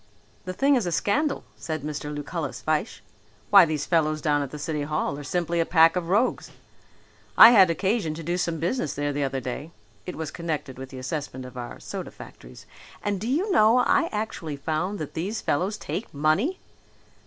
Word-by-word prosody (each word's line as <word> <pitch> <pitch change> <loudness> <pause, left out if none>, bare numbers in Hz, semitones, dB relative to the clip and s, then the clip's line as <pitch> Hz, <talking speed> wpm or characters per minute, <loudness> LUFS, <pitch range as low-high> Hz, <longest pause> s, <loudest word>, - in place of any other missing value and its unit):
"The 185 - -4
thing 275 +8 +3
is 235 -8 0
a - - -1
scandal," 285 - 0
said 155 -3 -5
Mr. 150 0 -4
Lucullus 150 0 -4
Fyshe. 155 +6 -2 0.5
"Why, 200 -3 +9
these 155 -2 -2
fellows 155 -3 +1
down 145 0 +1
at 140 - -4
the 150 - -8
city 150 0 -3
hall 150 -1 -2
are - - -7
simply 170 +3 -1
a - - +4
pack 165 0 +5
of 175 -2 -2
rogues. 210 +7 +1 0.9
I 225 - +11
had 195 -6 +7
occasion 190 -1 0
to 165 - -7
do 175 +3 -1
some 170 -2 -1
business 165 - -2
there 145 0 -1
the 145 0 -1
other 135 -1 -1
day 130 +4 -5 0.4
(it 180 - -5
was 160 -2 -5
connected 155 -6 -4
with 135 0 -7
the 130 - -10
assessment 130 -1 -5
of 125 - -11
our 120 -1 -7
soda - - -6
factories) - - -13 0.4
and 200 -2 -2
do 220 - -3
you 340 - 0
know, 230 - +5
I 280 +6 +3
actually 210 -8 -4
found 160 +7 -2
that 155 -5 -6
these 195 +7 -3
fellows 185 +8 -1
take 215 - -5
money!" 155 - +1
165 Hz, 195 wpm, -25 LUFS, 145-200 Hz, 0.9 s, I